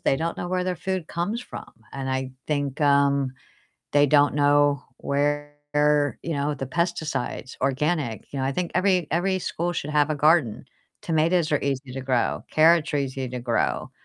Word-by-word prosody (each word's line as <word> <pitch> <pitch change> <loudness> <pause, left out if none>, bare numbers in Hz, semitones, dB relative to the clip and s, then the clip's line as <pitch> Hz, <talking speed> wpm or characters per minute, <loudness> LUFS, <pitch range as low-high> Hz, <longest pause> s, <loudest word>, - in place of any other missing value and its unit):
they 135 - +2
don't 165 +2 -2
know 175 - -4
where 180 0 0
their 180 -1 -2
food 185 -1 -3
comes 190 +8 -2
from, - - -9 0.2
and 135 -1 -4
I 130 0 -2 0.2
think, 145 -2 -2
um, 140 -2 +3 0.6
they 145 0 +5
don't 145 0 +4
know 145 -1 +3 0.2
where, 145 +1 -1 0.6
you 165 - -3
know, 145 +1 -1
the 135 -1 -5
pesticides, 160 -4 -2
organic, 135 -2 -1
you 140 - -4
know, 130 - 0
I 135 - 0
think 175 +4 -2
every 185 -2 +2
every 185 +3 +1
school 175 0 -2
should 150 -1 -3
have 150 0 +2
a - - +1
garden. 150 -7 +3 0.4
Tomatoes 165 +1 +1
are 145 - +2
easy 135 -1 -2
to 135 - -5
grow, 130 -2 0
carrots 160 0 +4
are - - +2
easy 135 -1 -3
to 125 0 -5
grow. 120 -1 -1
145 Hz, 180 wpm, -24 LUFS, 135-170 Hz, 0.6 s, they